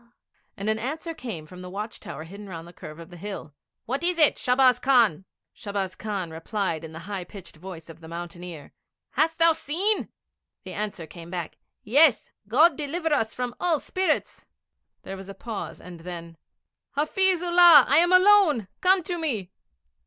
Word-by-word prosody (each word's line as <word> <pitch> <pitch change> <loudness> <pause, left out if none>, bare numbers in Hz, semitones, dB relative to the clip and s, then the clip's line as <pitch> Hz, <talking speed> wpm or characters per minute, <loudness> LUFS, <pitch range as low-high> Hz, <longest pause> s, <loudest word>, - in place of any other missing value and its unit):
And 200 - -4
an 220 0 +1
answer 310 +7 -4
came 225 - -7
from 180 +4 -12
the 180 - -8
watch 210 +4 -6
tower 155 - -8
hidden 200 +5 -10
round 165 -2 -8
the 175 - -13
curve 155 -2 -10
of 170 +1 -12
the 175 - -11
hill, 195 -5 -7 0.3
'What 270 +7 -3
is 355 0 +1
it, 305 -3 +5
Shahbaz 250 0 +4
Khan?' 230 - +3 0.3
Shahbaz 200 -3 -4
Khan 200 -6 -4
replied 165 0 -3
in 160 - -8
the 160 - -9
high 200 -2 -4
pitched 180 -2 -13
voice 170 -1 -10
of 165 -1 -12
the 160 - -11
mountaineer: 170 -2 -8 0.4
'Hast 320 +1 +1
thou 335 0 +6
seen?' 345 +7 0 0.5
The - - -8
answer 205 -5 -4
came 170 +1 -11
back: 175 -2 -6 0.2
'Yes. 275 +3 +4 0.2
God 300 +7 +4
deliver 315 +2 -1
us 225 -6 0
from 250 -1 -3
all 355 -1 +1
evil - - -3
spirits!' 375 +5 -2 0.6
There 195 - -6
was 190 0 -10
a 195 - -8
pause, 225 +2 -6
and 175 -2 -11
then: 170 -1 -8 0.6
'Hafiz 360 +5 +1
Ullah, 345 -2 +8
I 280 - +4
am 350 +2 +4
alone! 365 - +5
Come 370 0 +4
to 350 0 -4
me!' 225 - -2
215 Hz, 180 wpm, -25 LUFS, -, 0.6 s, Ullah